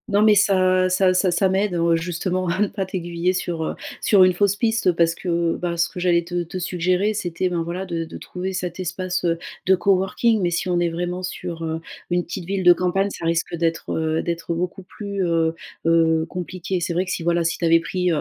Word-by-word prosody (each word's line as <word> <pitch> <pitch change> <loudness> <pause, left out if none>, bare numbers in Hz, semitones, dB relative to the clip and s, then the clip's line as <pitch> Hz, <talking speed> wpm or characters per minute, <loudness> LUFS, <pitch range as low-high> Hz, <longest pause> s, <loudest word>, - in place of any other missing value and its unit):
Non 205 -1 +3
mais, 215 -1 +6
ça 185 -2 +3
ça 185 0 +3
ça 185 +1 +2
ça 190 +3 +2
m'aide, 190 0 0
heu, 170 0 +3
justement 180 +2 -2
à 180 +3 -1
ne 210 - +3
pas 195 -1 -3
t'aiguiller 175 -1 -2
sur, 170 -3 -2
heu, - - -3 0.3
sur 200 -3 +5
une 185 0 +5
fausse 200 +2 +2
piste, 225 -3 +2
parce 165 0 +2
que, 170 -2 0
bah, 170 -1 -3
ce 170 - +2
que - - -8
j'allais 175 -1 +2
te 175 +1 -2
te 170 +2 -7
suggérer, 185 +3 0
c'était, 180 -3 -2
ben, 175 -2 -1
voilà, 175 +3 -4
de 170 -3 -3
de 160 - -9
trouver 185 +1 -5
cet 180 -1 -4
espace, 185 0 -2
heu, 165 -1 +1 0.3
de 190 - +6
coworking. 195 +4 +2
Mais 175 - +2
si 175 +2 -1
on 175 -1 +2
est 175 -1 +1
vraiment 175 +2 -3
sur, 170 -2 -5
heu, 160 0 -3 0.3
une 175 0 +1
petite 175 0 -6
ville 190 +1 -2
de 175 0 +8
campagne, 185 +3 0
ça 170 - -6
risque 165 +1 0
d'être, 165 -1 -1
heu, 160 0 0
d'être 170 0 -3
beaucoup, 180 +3 -3
plus, 200 +1 -4
heu 165 -2 +1 0.3
heu, 165 -1 +3
compliqué. 180 +1 -4
C'est 170 0 -2
vrai 180 +2 0
que 185 - -5
si, - - -2
voilà, 170 0 +2
si 165 - -1
tu - - -6
avais 165 0 +5
pris, 180 +1 -1
heu 160 - +1
180 Hz, 235 wpm, -22 LUFS, 170-185 Hz, 0.3 s, de